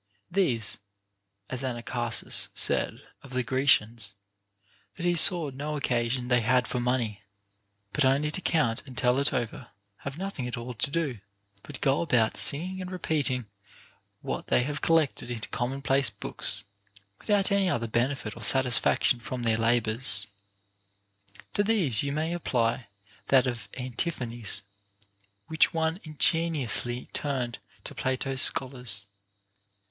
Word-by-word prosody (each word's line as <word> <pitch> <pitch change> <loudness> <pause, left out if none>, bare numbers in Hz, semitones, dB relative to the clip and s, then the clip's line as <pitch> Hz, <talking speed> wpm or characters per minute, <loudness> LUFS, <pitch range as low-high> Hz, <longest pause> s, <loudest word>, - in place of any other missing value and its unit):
These 130 - 0 0.7
(as 130 -1 -5
Anacharsis 120 -2 -1
said - - +2 0.2
of 135 -2 -13
the 125 0 0
Grecians, 120 -5 +1 0.8
that 170 - -6
he 175 - +3
saw 170 -3 +5
no 150 +3 -5
occasion 125 -2 -1
they 125 -1 +2
had 125 +2 +2
for 125 - -3
money, 120 -4 -1 0.7
but 150 - +1
only 140 +3 +2
to 185 - -1
count 135 -11 0
and 130 -1 -11
tell 125 +1 +3
it 140 - +2
over) 125 -2 -4 0.3
have 140 +1 -8
nothing 185 -9 -5
at 125 - -5
all 120 +1 -6
to 115 - -1
do, 145 -7 -2 0.4
but 145 +2 -10
"go 135 -1 +2
about 120 -9 +1
singing 185 +6 +5
and 180 - -6
repeating 150 -9 -1 0.8
what - - -5
they 125 - +2
have 150 +3 -4
collected 160 -6 +1
into 115 -2 -4
commonplace 135 +1 0
books, - - -1 0.6
with - - -15
out 200 -2 +2
any 200 -2 +2
other 115 -8 -1
benefit 120 -1 -2
or 115 - -11
satisfaction 125 0 +4
from 120 +2 -6
their 115 -1 +2
labors. 115 -2 +1 1.3
To 205 - +1
these 185 - +3
you 140 - -2
may 155 +3 -2
apply 120 -7 -1 0.4
that 130 -1 +4
of 115 -5 -4
Antiphanes, 120 - -4 0.8
which 160 +4 +2
one 160 +1 0
ingen 160 +2 +2
iously 120 +1 0
turned 130 -5 -2 0.2
to - - -8
Plato's 130 0 -1
scholars. 125 -7 +1
130 Hz, 140 wpm, -27 LUFS, 120-150 Hz, 1.3 s, saw